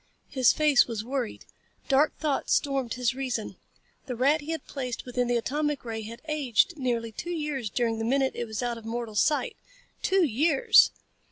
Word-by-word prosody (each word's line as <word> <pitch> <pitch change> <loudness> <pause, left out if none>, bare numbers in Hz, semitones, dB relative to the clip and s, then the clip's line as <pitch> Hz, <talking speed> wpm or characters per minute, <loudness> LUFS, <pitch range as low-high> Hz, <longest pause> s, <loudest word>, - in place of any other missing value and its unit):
His 260 -4 +4
face 300 -4 +4
was 225 -3 -4
worried. 255 -3 -4 0.4
Dark 280 +3 +3
thoughts 295 -3 0
stormed 270 -4 -1
his 250 -1 0
reason. 255 -4 -4 0.5
The 250 - -3
rat 280 +6 +2
he 295 - -10
had 325 -1 -3
placed 255 -4 -5
within 250 -1 -1
the 240 0 +2
atomic 295 +3 -2
ray 225 -1 -4
had 230 +4 -9
aged 305 - +1
nearly 240 -5 -2
two 345 - -7
years 300 -9 -3
during 230 0 -1
the - - -2
minute 265 +3 +1
it 240 - -3
was 220 +1 -4
out 240 -1 -2
of - - -16
mortal 230 -1 -4
sight. 290 +8 +1 0.5
Two 380 -2 +3
years! 285 +3 +5
255 Hz, 180 wpm, -27 LUFS, 235-290 Hz, 0.5 s, years